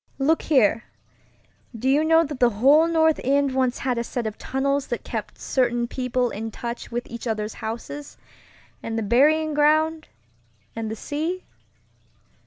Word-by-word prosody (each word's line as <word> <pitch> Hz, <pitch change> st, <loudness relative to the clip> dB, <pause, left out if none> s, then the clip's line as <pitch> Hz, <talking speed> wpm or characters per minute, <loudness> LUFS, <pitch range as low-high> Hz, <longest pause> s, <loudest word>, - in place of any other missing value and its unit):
Look 295 Hz, +4 st, +2 dB
here, 245 Hz, -7 st, +2 dB, 0.9 s
do 250 Hz, -, -3 dB
you 285 Hz, +3 st, +4 dB
know 325 Hz, +1 st, +5 dB
the 270 Hz, -6 st, +1 dB
whole 275 Hz, +9 st, +4 dB
North 320 Hz, -1 st, +2 dB
End 280 Hz, +1 st, +2 dB
once 260 Hz, -2 st, +1 dB
had 250 Hz, -3 st, -1 dB
a -, -, -1 dB
set 240 Hz, 0 st, -4 dB
of 215 Hz, -1 st, -3 dB
tunnels 275 Hz, +1 st, -1 dB
that -, -, -4 dB
kept -, -, -6 dB
certain 240 Hz, -2 st, 0 dB
people 250 Hz, -1 st, -1 dB
in 225 Hz, +2 st, -5 dB
touch 235 Hz, +2 st, -6 dB
with 240 Hz, +1 st, -3 dB
each 235 Hz, +1 st, -7 dB
other's 215 Hz, -1 st, -2 dB
houses, 235 Hz, +6 st, -7 dB, 0.6 s
and 225 Hz, 0 st, -4 dB
the 225 Hz, -, -1 dB
burying 300 Hz, +8 st, +3 dB
ground, 310 Hz, +2 st, +2 dB, 0.7 s
and 225 Hz, -1 st, -3 dB
the 220 Hz, -, -4 dB
sea? 320 Hz, +10 st, -3 dB
260 Hz, 155 wpm, -24 LUFS, 235-300 Hz, 0.9 s, know